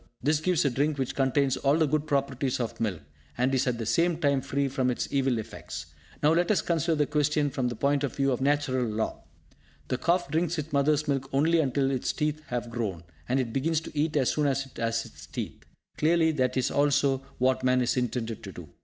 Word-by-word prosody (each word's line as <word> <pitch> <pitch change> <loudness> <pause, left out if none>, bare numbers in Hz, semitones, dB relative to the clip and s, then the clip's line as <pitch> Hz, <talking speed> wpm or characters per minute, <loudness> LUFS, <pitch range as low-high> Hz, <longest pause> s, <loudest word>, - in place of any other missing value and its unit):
This 150 +2 +2
gives 170 -1 +1
a 140 - +3
drink 145 +4 0
which 130 -2 -2
contains 135 0 +2
all 140 +2 +2
the 160 - +3
good 150 +1 0
properties 140 -2 0
of 120 -2 -3
milk, 100 -8 -1 0.4
and 130 +2 +1
is 130 0 +1
at 125 -2 0
the 115 - -4
same 170 +8 +2
time 140 -4 +2
free 140 +2 -1
from 130 -1 0
its 125 - -1
evil 135 -3 +1
effects. 80 -7 -7 0.3
Now 150 +2 +5
let 175 +1 +2
us 215 - +2
consider 165 -1 +1
this 150 -1 0
question 150 -1 +1
from 130 -2 -1
the 120 - -3
point 140 +4 +1
of 140 - -2
view 135 -1 +1
of 125 - -1
Natural 135 -2 +1
law. 110 -1 -2 0.7
The 130 - -1
calf 175 -2 +1
drinks 170 +1 0
its 155 0 -5
mother's 145 +2 +2
milk 135 -1 -1
only 160 +5 +3
until 135 -2 +1
its 130 -2 -1
teeth 150 0 -1
have 120 -1 -3
grown; 100 -8 -3 0.3
and 130 +2 +2
it 120 -3 -2
begins 155 +4 +1
to 160 - -10
eat 150 +1 +1
as 130 -3 +2
soon 150 -1 +1
as 135 0 0
it 135 - -17
has 115 0 -1
its - - -13
teeth. - - -6 0.4
Clearly, 160 +1 +3
this 130 -4 0
is 130 - +1
also 140 -1 +2 0.2
what 130 0 +1
man 130 0 +3
is 120 - +1
intended 115 -3 -2
to 95 - -8
do. 85 -5 -10
135 Hz, 225 wpm, -28 LUFS, 125-150 Hz, 0.7 s, Now